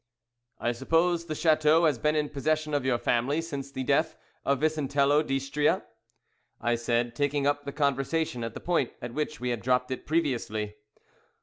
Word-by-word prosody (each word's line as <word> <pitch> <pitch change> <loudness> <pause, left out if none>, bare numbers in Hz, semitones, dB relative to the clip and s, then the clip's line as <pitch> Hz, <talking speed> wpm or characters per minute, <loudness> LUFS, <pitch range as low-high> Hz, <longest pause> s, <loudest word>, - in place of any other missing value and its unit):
'" 120 +1 -50
"I 120 - 0
suppose 165 +7 +1
the 155 - -3
chateau 155 +1 +4
has 145 -7 +2
been 150 +3 +1
in 150 -1 0
possession 155 +2 -1
of 145 -2 +1
your 130 -2 +2
family 125 +6 +1
since 140 -5 -5
the 130 -1 -4
death 145 +4 +1 0.3
of 140 0 +1
Vicentello 145 -2 +2
d'Istria?" 135 +1 0 0.8
I 120 +1 +1
said, 120 0 0
taking 145 +1 0
up 145 0 +1
the 140 - -4
conversation 140 -1 0
at 115 -1 -5
the - - -7
point 170 -8 0
at 120 - -6
which 150 0 -3
we 125 - -2
had 120 - -3
dropped 125 +1 +1
it 130 - -5
previously. 120 -9 -1
140 Hz, 180 wpm, -28 LUFS, 125-155 Hz, 0.8 s, chateau